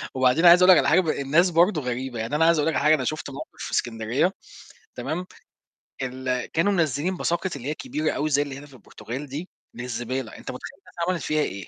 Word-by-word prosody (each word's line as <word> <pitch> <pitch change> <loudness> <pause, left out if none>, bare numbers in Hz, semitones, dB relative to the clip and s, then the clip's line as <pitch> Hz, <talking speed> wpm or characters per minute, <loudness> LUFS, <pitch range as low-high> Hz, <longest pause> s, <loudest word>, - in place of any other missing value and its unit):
وبعدين 130 +6 +3
عايز 175 +1 +9
أقول 185 - +8
لك - - +8
على - - +2
حاجة - - +5
ب 165 - -6
الناس 155 +6 +2
برضه 170 -1 +3
غريبة، 125 -1 -4
يعني 115 +6 -2
أنا 160 +2 +3
عايز 170 -1 +4
أقول 150 - +1
لك - - -1
على - - 0
حاجة، 155 +1 +6
أنا 130 - -3
شُفت 155 0 -3
موقِف 135 - -8 0.2
في - - -7
إسكندرية 120 - 0 0.6
تمام، 155 +9 -4 0.8
ال 130 -1 -2
كانوا 170 +5 +2
منزّلين 165 +2 0
باساكت 175 0 -1
اللي 135 0 -7
هي - - 0
الكبيرة 270 - -2
أوي 155 +1 -1
زي 145 0 +3
اللي 140 -2 -4
هنا 145 - -10
في 140 - -19
البرتغال 130 +3 -8
دي 150 +7 -6 0.2
للزبالة، 120 0 -4
أنت - - -7
مُتخيّل 130 - -9
الناس - - -21
عملت 180 -2 -1
فيها 155 0 +1
إيه؟ 95 -6 -4
145 Hz, 225 wpm, -24 LUFS, 130-170 Hz, 0.8 s, عايز